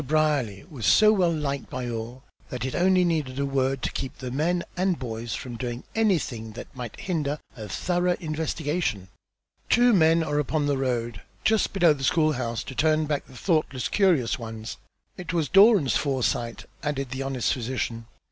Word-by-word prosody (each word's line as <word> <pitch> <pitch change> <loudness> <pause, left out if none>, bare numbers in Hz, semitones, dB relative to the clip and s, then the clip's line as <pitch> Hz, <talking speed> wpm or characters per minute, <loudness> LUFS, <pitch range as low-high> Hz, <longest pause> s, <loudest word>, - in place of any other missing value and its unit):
Brierly 145 -9 0
was 140 - -4
so 215 0 +6
well 180 -5 +3
liked 140 -4 -3
by 125 -1 -4
all 120 +2 -5 0.3
that 125 0 -4
it 130 - -3
only 185 0 +3
needed 150 -6 -1
a 140 - 0
word 135 -1 0
to - - -1
keep 135 +2 -5
the 130 -2 -6
men 170 +6 0
and 185 -1 +1
boys 115 -2 -4
from 120 -2 -6
doing 120 0 -4
anything 150 - 0
that 120 - -10
might 120 -3 -7
hinder 150 -5 -1 0.2
a 110 -4 -8
thorough 180 - 0
investigation. 155 - -2 0.6
Two 240 0 +5
men 165 -2 +4
are 150 -2 0
upon 150 +1 0
the 140 -2 0
road 120 -5 -2 0.2
just 220 -1 +2
below 175 -5 +4
the 135 -2 -7
school 155 +2 +3
house 120 -4 -3
to - - -8
turn 155 +3 +2
back 150 -1 -2
the 130 - -13
thoughtless 155 -6 0
curious 160 - +2
ones. 110 -1 -7 0.4
It 180 -2 -5
was 165 -4 +1
Doran's 195 - +6
foresight," 125 -4 -1 0.2
added 140 -4 -3
the 130 +1 -4
honest 135 -3 0
physician. 115 -2 -3
140 Hz, 175 wpm, -26 LUFS, 125-165 Hz, 0.6 s, so